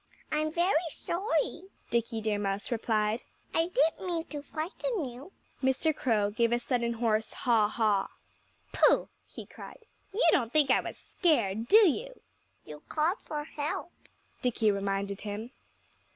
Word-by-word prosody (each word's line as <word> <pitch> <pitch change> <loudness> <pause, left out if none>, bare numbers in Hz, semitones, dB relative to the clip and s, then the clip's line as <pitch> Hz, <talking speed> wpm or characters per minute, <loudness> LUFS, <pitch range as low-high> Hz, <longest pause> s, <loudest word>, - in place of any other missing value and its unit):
"I'm 310 0 0
very 345 0 +1
sorry," 340 +1 -1 0.3
Dickie 230 -1 0
Deer 215 -1 0
Mouse 200 +2 -2
replied. 220 -1 0 0.3
"I 330 +1 +2
didn't 325 +2 +1
mean 335 -2 -1
to 295 -2 -5
frighten 330 - -3
you." 255 +8 -9 0.3
Mr. 265 +4 +2
Crow 210 -5 +1
gave 230 +2 +1
a 240 - +3
sudden 240 -1 -1
hoarse 220 -1 0
haw 230 -4 +3
haw. 210 -2 +1 0.7
"Pooh!" - - +4 0.2
he - - -9
cried. 450 - -12 0.3
"You 425 +5 +1
don't 235 -4 +2
think 295 -2 +4
I - - +5
was - - -7
scared, 230 - 0
do 430 - +8
you?" - - -2 0.5
"You 150 -1 -10
called 330 +8 +1
for 300 -1 -5
help," 295 0 -4 0.5
Dickie 225 -3 +2
reminded 200 0 -2
him. 215 +3 -5
250 Hz, 145 wpm, -30 LUFS, 215-320 Hz, 0.7 s, do